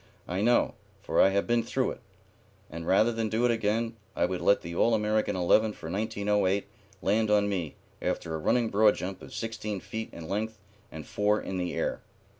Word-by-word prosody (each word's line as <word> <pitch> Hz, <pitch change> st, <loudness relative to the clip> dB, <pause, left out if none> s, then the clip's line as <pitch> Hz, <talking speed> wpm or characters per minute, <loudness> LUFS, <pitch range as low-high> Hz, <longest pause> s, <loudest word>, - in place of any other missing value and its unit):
I 90 Hz, +3 st, -2 dB
know, 120 Hz, +3 st, +3 dB, 0.3 s
for -, -, +2 dB
I -, -, +6 dB
have 100 Hz, +1 st, +1 dB
been 120 Hz, 0 st, +2 dB
through 115 Hz, -, -1 dB
it; -, -, -9 dB, 0.7 s
and 85 Hz, +1 st, -6 dB
rather 110 Hz, +5 st, +4 dB
than 115 Hz, -1 st, -2 dB
do 115 Hz, +3 st, +1 dB
it 120 Hz, -, +4 dB
again 115 Hz, +1 st, 0 dB, 0.2 s
I -, -, +2 dB
would 90 Hz, 0 st, -3 dB
let 100 Hz, -, +4 dB
the 85 Hz, 0 st, -7 dB
All 115 Hz, +6 st, +3 dB
American 105 Hz, -1 st, +1 dB
eleven 105 Hz, +4 st, +3 dB
for 80 Hz, -, -8 dB
1908 100 Hz, -1 st, 0 dB, 0.4 s
land 110 Hz, +2 st, +2 dB
on 105 Hz, -1 st, +4 dB
me 90 Hz, -6 st, -2 dB, 0.3 s
after 80 Hz, -, -2 dB
a 80 Hz, -, -2 dB
running 115 Hz, +8 st, +2 dB
broad 105 Hz, +1 st, +5 dB
jump 95 Hz, +1 st, -5 dB
of -, -, -11 dB
sixteen 110 Hz, -3 st, -4 dB
feet 110 Hz, +4 st, -6 dB
in 80 Hz, -1 st, -9 dB
length 110 Hz, +4 st, -2 dB, 0.3 s
and 80 Hz, -2 st, -8 dB
four 105 Hz, +1 st, +1 dB
in 95 Hz, -1 st, -4 dB
the 90 Hz, -1 st, -2 dB
air." -, -, -1 dB
105 Hz, 200 wpm, -28 LUFS, 95-110 Hz, 0.7 s, I